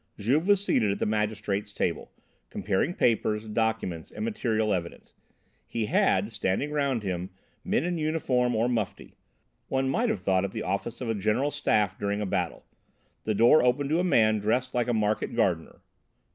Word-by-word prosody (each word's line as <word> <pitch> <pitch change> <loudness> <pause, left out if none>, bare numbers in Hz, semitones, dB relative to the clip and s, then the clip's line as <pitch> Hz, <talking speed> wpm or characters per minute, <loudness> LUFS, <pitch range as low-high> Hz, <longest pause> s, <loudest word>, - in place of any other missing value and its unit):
Juve 135 - +1
was 200 -1 +3
seated 105 - +2
at 100 - -2
the - - -1
magistrate's 105 -1 -1
table, 85 -4 -2 0.4
comparing 100 - -1
papers, 110 -2 +1
documents, 110 -6 -2
and 220 - -5
material 110 - 0
evidence; 85 -2 -5 0.5
he 115 -2 -2
had, 105 0 +2
standing 115 +8 -1
round 140 -6 0
him 90 -1 -3 0.3
men - - 0
in 175 -1 -2
uniform 130 -6 +1
or 115 +2 +2
mufti. 115 -6 -3 0.5
One 135 0 0
might 135 - +1
have - - -1
thought 95 -1 +2
it 100 - -3
the - - -3
office 100 +6 -3
of 120 - -3
a - - +1
general 110 +8 0
staff 105 -9 0
during 100 0 -1
a 105 - -1
battle. 95 - -2 0.6
The 110 - 0
door 120 +8 +6
opened 135 +3 +1
to 165 - +3
a - - +1
man 110 -11 +3
dressed 125 +5 0
like 120 -1 0
a 120 - +1
market 105 +1 0
gardener. 90 -8 0
110 Hz, 175 wpm, -27 LUFS, 100-130 Hz, 0.6 s, door